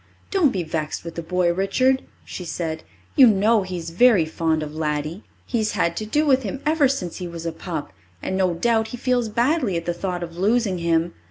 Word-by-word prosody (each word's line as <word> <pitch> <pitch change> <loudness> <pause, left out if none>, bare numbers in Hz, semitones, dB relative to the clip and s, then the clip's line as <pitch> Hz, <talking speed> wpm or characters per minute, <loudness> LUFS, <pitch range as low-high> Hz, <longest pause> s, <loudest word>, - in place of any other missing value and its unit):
"Don't 360 -9 +3
be 185 -3 -2
vexed 155 -1 -3
with 170 - -6
the 170 - -4
boy, 175 +1 +1
Richard," 255 +8 +2 0.2
she 180 - -7
said. 165 -2 -4 0.3
"You 265 - +8
know 215 +1 +4
he 185 -1 -5
is 165 -1 -6
very 200 -2 +5
fond 160 0 0
of 150 0 -7
Laddie. 155 +4 -3 0.2
He's 220 -3 -1
had 170 -4 0
to 215 - -3
do 300 +8 +1
with 265 -2 +4
him 225 +3 -4
ever 305 -2 +4
since 195 -11 -3
he 180 - -5
was 170 -1 -7
a 165 - -1
pup, 160 - -6 0.3
and 190 - -3
no 185 -2 +1
doubt 225 +4 +1
he 245 - -7
feels 245 -2 0
badly 240 - +1
at 165 - -5
the 175 - 0
thought 180 0 -3
of 165 -1 -8
losing 205 -2 +2
him. 170 0 +1
185 Hz, 220 wpm, -23 LUFS, 170-235 Hz, 0.3 s, You